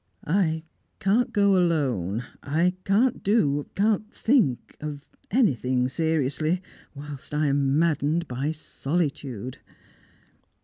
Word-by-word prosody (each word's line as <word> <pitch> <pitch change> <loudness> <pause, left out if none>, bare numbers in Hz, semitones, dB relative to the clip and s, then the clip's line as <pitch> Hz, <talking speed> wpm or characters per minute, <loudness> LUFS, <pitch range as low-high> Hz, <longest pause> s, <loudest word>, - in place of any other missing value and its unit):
"I 160 -2 +1 0.4
can't 215 +4 +2
go 200 -1 +4
alone. 130 - +1 0.2
I 165 +5 +1
can't 225 +6 +2
do 145 -9 +1
can't 215 +1 +1
think 220 - +1
of 145 -1 -6 0.2
anything 130 - +2
seriously, 160 +3 0 0.3
whilst 145 0 -7
I 150 +1 +2
am 140 0 +2
maddened 160 0 +1
by 135 +5 -2
solitude!" 140 - -3
155 Hz, 100 wpm, -25 LUFS, 140-190 Hz, 0.4 s, go